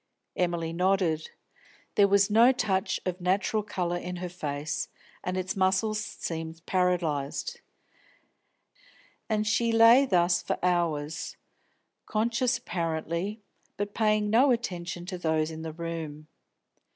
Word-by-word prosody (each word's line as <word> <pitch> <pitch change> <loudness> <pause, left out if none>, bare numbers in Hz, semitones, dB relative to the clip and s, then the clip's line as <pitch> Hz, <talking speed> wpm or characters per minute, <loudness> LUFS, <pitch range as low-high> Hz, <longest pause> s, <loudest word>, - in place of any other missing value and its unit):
Emily 170 -2 -1
nodded. 180 -3 +1 0.6
There 200 - +5
was 200 +1 +3
no 230 +4 +7
touch 200 -7 0
of 185 0 -3
natural 195 +4 +1
colour 180 -4 -2
in 180 +1 -5
her 180 0 -5
face, 150 -3 -3 0.4
and 185 +1 -2
its 185 0 -2
muscles 195 +3 +2
seemed 165 -4 -6
paralysed. 180 - -1 1.7
And 215 -1 +1
she 230 +2 +2
lay 230 +4 +7
thus 175 -4 +3
for - - -2
hours, 160 -4 -1 0.7
conscious 235 +3 +1
apparently, 170 +1 -3 0.3
but 205 0 -3
paying 215 -1 +2
no 250 +5 +5
attention 180 -8 -2
to 180 -1 -5
those 160 -1 0
in 160 0 -7
the 160 0 -5
room. 160 -2 -6
180 Hz, 120 wpm, -28 LUFS, 165-215 Hz, 1.7 s, no